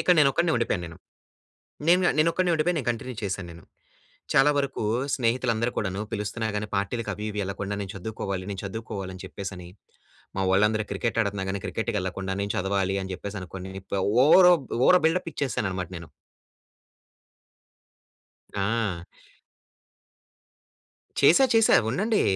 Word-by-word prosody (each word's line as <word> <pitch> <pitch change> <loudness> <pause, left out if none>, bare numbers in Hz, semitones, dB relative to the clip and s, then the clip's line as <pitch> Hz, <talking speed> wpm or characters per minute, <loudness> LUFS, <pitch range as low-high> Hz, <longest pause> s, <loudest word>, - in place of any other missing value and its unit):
ఇక్కడ 180 - +4
నేనొక్కడినే 155 +4 +3
ఉండిపోయాను 110 -6 -1
నేను. 85 -1 -10 0.9
నేనుగా 180 +2 +5
నేనొక్కడినే 165 +3 +2
ఉండిపోయి 165 +3 +1
నేను 125 -4 -3
కంటిన్యూ 120 +2 -5
చేశాను 95 -2 -3
నేను. 85 0 -13 0.7
చాలా 140 +2 +5
వరకు 140 -3 -2 0.3
స్నేహితులు 120 0 +1
అందరు 115 +2 0
కూడాను 95 -1 -2
పిలుస్తున్నా 110 +1 -2
గాని 105 +1 -2
పార్టీలకి 105 +2 -2
అవి 105 +2 -6
ఇవి 105 - -3
యెళ్ళకుండా 100 +1 -4
నేను 95 - -5
చదువుకోవాలి, 100 -2 -4
నేను 95 -2 -4
చదువుకోవాలి 100 -2 -5
అని 90 - -9
చెప్పేసని. 95 -2 -7 0.7
మా 95 - 0
వోళ్ళందరూ 105 +3 +3
క్రికెట్ 115 +4 -2
ఆడుతన్న 100 -2 -2
గాని, 95 0 -2
క్రికెట్‌కెళ్ళకుండా 95 -4 -2
నేను 100 0 -1
చదవాలి 95 0 0
అని 95 - -5
చెప్పేసనుకొని, 95 -1 -7 0.5
ఓవరో 180 +3 +8 0.3
ఓవర్ 180 - +6
బిల్డప్ 165 +2 0
ఇచ్చేసాననమాట 95 -10 -2
నేను. 85 -2 -9 2.5
ఆ! 100 -3 -1 2.2
చేశా 170 - +6
చేశా 225 -1 +5 0.2
ఉండండి. 210 - +1
105 Hz, 125 wpm, -26 LUFS, 95-130 Hz, 2.5 s, ఓవరో